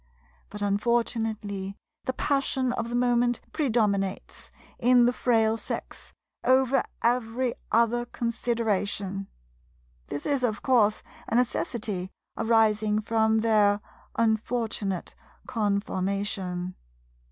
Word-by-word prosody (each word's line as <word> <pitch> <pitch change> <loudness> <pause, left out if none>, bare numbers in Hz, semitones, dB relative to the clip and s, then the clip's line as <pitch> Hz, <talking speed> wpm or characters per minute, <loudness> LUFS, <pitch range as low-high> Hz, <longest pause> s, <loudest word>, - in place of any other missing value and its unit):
But 205 0 -5
unfortunately 210 -2 -1 0.3
the 260 - -1
passion 265 -2 0
of 230 -1 -3
the 240 - -3
moment 245 0 +2
predominates, 210 -8 -1 0.3
in 245 0 +5
the 245 - +3
Frail 225 -3 +2
Sex, - - -6 0.3
over 260 +1 +4 0.2
every 240 +1 +1 0.2
other 235 +1 +3
consideration. 205 -4 -1 0.8
This 145 - -5
is, 280 -3 +1
of 220 -3 0
course, 220 -5 +3 0.2
a - - -1
necessity 220 -6 -1 0.3
arising 220 -2 +3
from 220 0 +2
their 210 -2 +4 0.4
unfortunate 220 -4 -1 0.3
conformation. 200 -3 -1
225 Hz, 95 wpm, -27 LUFS, 205-240 Hz, 0.8 s, in